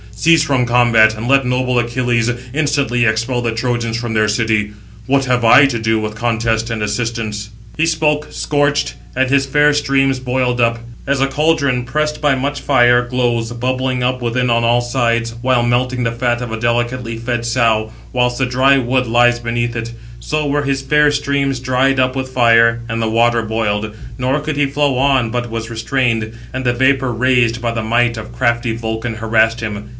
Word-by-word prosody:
Cease 160 +7 +3
from 130 -5 0
combat, 115 -3 +4
and 110 +2 -6
let 135 -1 +3
noble 125 0 0
Achilles 120 0 0 0.2
instantly 140 -5 0
expel 115 +3 -1
the 115 -1 -2
Trojans 115 -1 -2
from 115 -1 -4
their 110 -1 +2
city; 105 -1 0 0.3
what 135 0 +2
have 125 -2 0
I 125 +5 +7
to 125 -4 -1
do 110 0 0
with 110 0 -4
contest 115 0 -1
and 110 -2 -3
assistance?" 105 -1 -3 0.3
He 160 +1 +1
spoke, 150 -2 0
scorched; 145 -1 -1 0.2
and 130 0 +1
his 135 0 +2
fair 150 +2 +3
streams 135 -2 +1
boiled 125 -1 -1
up. 115 0 +2 0.3
As 140 -1 0
a 135 - +3
caldron 140 -3 0
pressed 150 +4 -2
by 145 -2 +2
much 140 +2 -3
fire, 120 -3 +4
glows, 120 -2 -1
bubbling 130 +1 -2
up 125 0 -1
within 120 +1 -1
on 115 0 +2
all 120 +1 +2
sides, 115 -1 -1
while 125 -1 +2
melting 125 +1 0
the 115 - 0
fat 120 0 -1
of 120 -2 -5
a 110 - -4
delicately 120 0 -2
fed 120 0 -3
sow, 115 -2 +1 0.2
whilst 125 -1 0
the 130 - +1
dry 130 +2 +3
wood 125 0 0
lies 120 +1 +3
beneath 120 0 -2
it; 115 0 -4 0.3
so 155 0 -2
were 145 0 0
his 135 -1 -2
fair 150 +2 +3
streams 140 -2 -1
dried 130 +1 +1
up 130 0 +1
with 130 -1 -3
fire, 115 -2 +3
and 115 0 -2
the 110 - 0
water 115 +1 +2
boiled; 110 -1 -2 0.2
nor 130 +3 0
could 150 0 -4
he 145 -1 +2
flow 140 -1 0
on, 135 -4 +2
but 120 0 -3
was 115 0 -5
restrained, 115 -1 -1 0.2
and 130 +1 -4
the 120 -1 +1
vapour 130 +1 +1
[raised] 120 -1 +1
by 120 0 -2
the 115 -1 -3
might 115 +1 +1
of 110 +1 -8
crafty 120 -1 -1
Vulcan 110 0 -4
harassed 110 +1 +1
him. 105 -1 -5
120 Hz, 190 wpm, -16 LUFS, 115-130 Hz, 0.3 s, I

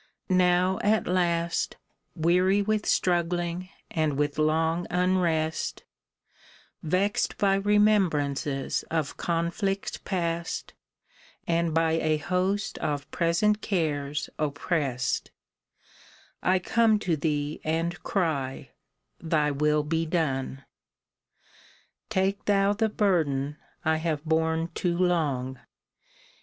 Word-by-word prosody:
Now 185 0 +3
at 215 +1 +2
last, 170 -2 0 0.4
Weary 180 +5 +3
with 215 +1 0
struggling 175 0 0 0.2
and 155 -4 0
with 145 +1 0
long 160 +2 +1
unrest, 175 -3 0 1.0
Vext 185 +6 0
by 195 -1 +3
remembrances 190 -10 +2
of 160 -3 -1
conflicts 175 +4 -2
past 170 -3 -3 0.7
And 170 0 +1
by 165 0 +2
a 155 -1 +1
host 185 +5 -1
of 145 -1 -3
present 210 +6 +2
cares 150 -6 -1
opprest, 145 -4 -1 1.1
I 185 +1 +3
come 220 +4 +3
to 180 -5 0
thee 150 -1 -2
and 165 +2 -1
cry, 150 -9 -2 0.5
Thy 155 -3 +1
will 150 +1 +2
be 165 +2 -1
done! 135 -5 -1 1.4
Take 195 +1 0
thou 200 0 +3
the 220 +1 +1
burden 150 -9 +1 0.3
I 160 0 +3
have 160 -2 -2
borne 160 +1 +1
too 175 -1 -1
long. 145 -8 0
165 Hz, 100 wpm, -27 LUFS, 155-185 Hz, 1.4 s, Now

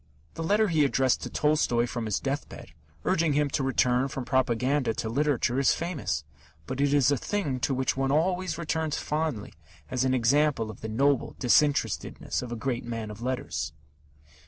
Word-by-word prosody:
The - - -6
letter 205 +5 +2
he 160 -3 +3
addressed 130 -2 +2
to - - -5
Tolstoy 150 -6 +2
from 120 -2 -4
his 105 - 0
death 140 +1 -3
bed, - - -11 0.3
urging 165 -4 +2
him 145 -1 +1
to - - 0
return 130 -1 +2
from 135 -1 -5
propaganda 130 0 +1
to 110 - -3
literature, 135 -1 +1
is 135 - +4
famous, 155 - -3 0.4
but 130 - -3
it 140 -1 +3
is 145 -1 +4
a 140 - +2
thing 145 - -2
to 135 - 0
which 130 0 0
one 135 0 0
always 180 +2 +1
returns 160 -2 -1
fondly 150 -8 -2 0.4
as 130 -1 +1
an 130 0 +2
example 130 -1 +2
of 105 - -14
the 110 - -5
noble 135 +4 +1
disinterestedness 145 +3 +1
of 125 -1 -7
a - - -2
great 120 +1 -2
man 115 -2 -5
of 105 +2 -10
letters. 120 -10 -3
135 Hz, 180 wpm, -27 LUFS, 120-150 Hz, 0.4 s, is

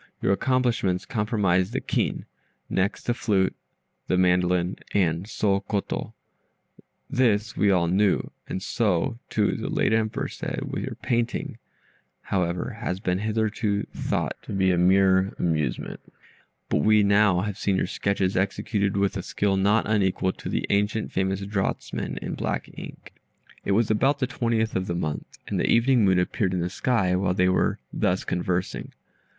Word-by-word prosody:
Your - - +1
accomplishments 120 -5 +1
comprised 105 -3 +1
the - - 0
kin, - - -1 0.5
next 95 +2 0
the 120 - 0
flute, 100 -5 +1 0.5
the 90 - +2
mandolin, 90 0 +2 0.2
and 90 -1 +1
soh 100 -2 +1
koto 100 0 -3 0.9
this 110 -4 +1
we 105 - +3
all 90 -3 +3
knew, 95 +3 +2 0.2
and 95 - -3
so, 115 +3 0
too, 105 -2 +1
the - - -4
late - - +1
Emperor 110 -1 0
said: - - -5
your - - -4
painting, 120 -1 -1 0.6
however, 90 +4 -2
has 95 -5 -2
been 90 -2 -1
hitherto 110 -1 0
thought - - -2
to - - -8
be 95 -2 +3
mere 95 +2 +4
amusement, 80 -7 -1 0.7
but - - +1
we 110 +2 +5
now 100 -2 +4
have 105 0 -4
seen 100 - +1
your - - +1
sketches 95 0 -1
executed 100 +1 0
with 100 +1 +1
a 95 - -2
skill 100 +2 0
not 100 +3 +2
unequal 95 -3 +1
to - - -8
the - - -1
ancient 105 +2 0
famous 95 +1 0
draughtsmen 100 0 -3
in - - -4
black - - -2
ink." - - -10 0.5
It 100 - 0
was 110 +1 +2
about 135 +7 +3
the 140 - 0
twentieth 115 -4 -1
of 95 0 -1
the 85 - -2
month, 75 -3 -4
and - - -1
the - - +1
evening 120 0 +4
moon 95 -1 +4
appeared 95 +1 0
in - - 0
the 90 +1 -2
sky, 95 -5 +1
while 90 -1 +1
they 90 0 +3
were 95 - +1 0.2
thus 90 +1 +1
conversing. 90 +1 -2
100 Hz, 155 wpm, -25 LUFS, 90-110 Hz, 0.9 s, we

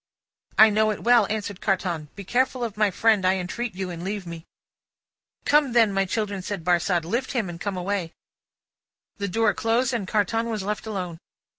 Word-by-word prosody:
"I 220 0 +8
know 215 +1 +3
it 210 - -3
well," 235 -3 +5
answered 205 -2 -4
Carton. 175 -6 -1
"Be 200 - -7
careful 250 +4 0
of 225 -3 -3
my 210 -1 +3
friend, 215 +1 +2
I 185 +1 +3
entreat 190 +4 -4
you, 185 -1 -4
and 170 0 -7
leave 200 0 -4
me." 170 -1 -9 1.0
"Come, 290 -4 +3
then, 225 -4 +4
my 195 0 +2
children," 205 0 -2
said 190 -2 -5
Barsad. 175 0 +1
"Lift 240 +11 -2
him, 235 -6 0
and 170 0 -8
come 200 -2 -3
away!" 180 -2 -2 1.1
The 200 - -2
door 215 +2 +2
closed, 235 +3 +1
and 215 -5 -2
Carton 225 +3 0
was 215 -4 -3
left 210 +2 -3
alone. 180 -6 -4
205 Hz, 185 wpm, -25 LUFS, 185-225 Hz, 1.1 s, I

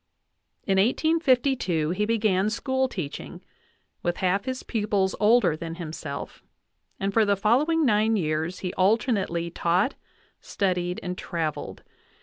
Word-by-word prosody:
In 195 -1 +2
1852 255 - +2
he 205 +4 0
began 210 -3 +1
school 260 +3 0
teaching, 170 - -6 0.6
with 175 0 -1
half 190 +3 0
his 260 -1 -4
pupils 205 -4 0
older 220 -5 +4
than 165 +1 -6
himself; 155 -4 -7 0.6
and 195 +1 -1
for 225 - +4
the 200 -1 +2
following 290 - +2
nine 220 -1 +3
years 160 -1 -1
he 180 -1 -3
alternately 190 -4 +1
taught, 180 +9 +1 0.5
studied, 180 -2 -1
and 180 0 -4
traveled. 160 -3 -4
195 Hz, 125 wpm, -26 LUFS, 175-230 Hz, 0.6 s, older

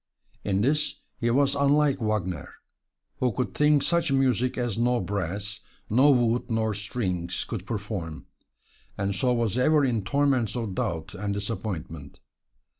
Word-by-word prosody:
In 100 -1 +1
this 150 +6 +1 0.2
he 120 - +1
was 135 +3 +3
unlike 140 -1 +3
Wagner, 95 -8 -2 0.6
who 125 -1 +2
could 125 +3 -2
think 150 -1 +4
such 170 -4 +1
music 130 -2 +2
as 120 -4 -1
no 120 +1 +2
brass, 100 +2 -3 0.3
no 130 +6 +6
wood 120 -3 +2
nor 110 -1 0
strings 95 -4 -2
could 100 -4 -6
perform, 100 -7 -4 0.7
and 100 0 -1
so 125 +7 +1
was 115 -1 +1
ever 150 +2 +4
in 115 -5 0
torments 135 0 +1
of 115 -5 -3
doubt 85 -7 -3
and 100 +1 -3
disappointment. 95 -8 -5
115 Hz, 140 wpm, -26 LUFS, 100-130 Hz, 0.7 s, no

